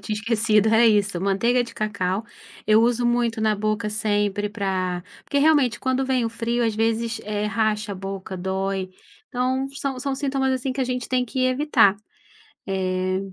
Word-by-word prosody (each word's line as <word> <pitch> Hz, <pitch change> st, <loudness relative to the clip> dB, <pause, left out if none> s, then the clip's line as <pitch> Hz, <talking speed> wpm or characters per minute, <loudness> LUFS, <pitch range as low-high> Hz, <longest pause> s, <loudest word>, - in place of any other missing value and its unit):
tinha 215 Hz, -, -3 dB
esquecido, 220 Hz, -1 st, +2 dB
É 235 Hz, +1 st, +6 dB
isso, 205 Hz, -4 st, +2 dB
manteiga 230 Hz, +6 st, +2 dB
de 235 Hz, -, -10 dB
cacau. 200 Hz, -1 st, -2 dB, 0.4 s
Eu 215 Hz, +1 st, +5 dB
uso 240 Hz, 0 st, +2 dB
muito 240 Hz, -2 st, +1 dB
na 215 Hz, -1 st, +2 dB
boca 215 Hz, +1 st, -1 dB
sempre 205 Hz, -1 st, 0 dB
pra 185 Hz, -4 st, -2 dB, 0.2 s
Porque 285 Hz, -, 0 dB
realmente, 280 Hz, -6 st, +3 dB
quando 260 Hz, 0 st, 0 dB
vem 255 Hz, -3 st, +1 dB
o -, -, 0 dB
frio 235 Hz, +1 st, -1 dB
às 225 Hz, -2 st, 0 dB
vezes, 225 Hz, +1 st, 0 dB
eh, 210 Hz, 0 st, -2 dB
racha 215 Hz, -1 st, 0 dB
a -, -, -5 dB
boca, 195 Hz, 0 st, -6 dB
dói. 190 Hz, +1 st, -2 dB, 0.4 s
Então, 260 Hz, +2 st, -1 dB
são 275 Hz, -2 st, -3 dB
são 275 Hz, +1 st, -2 dB
sintomas, 265 Hz, -1 st, 0 dB
assim, 260 Hz, +1 st, -1 dB
que 270 Hz, -, -4 dB
a -, -, +2 dB
gente 250 Hz, -1 st, -3 dB
tem 255 Hz, -1 st, +1 dB
que 255 Hz, +2 st, -1 dB
evitar. 255 Hz, -6 st, +4 dB, 0.7 s
Eh. 185 Hz, -1 st, -1 dB
220 Hz, 175 wpm, -23 LUFS, 200-250 Hz, 0.7 s, É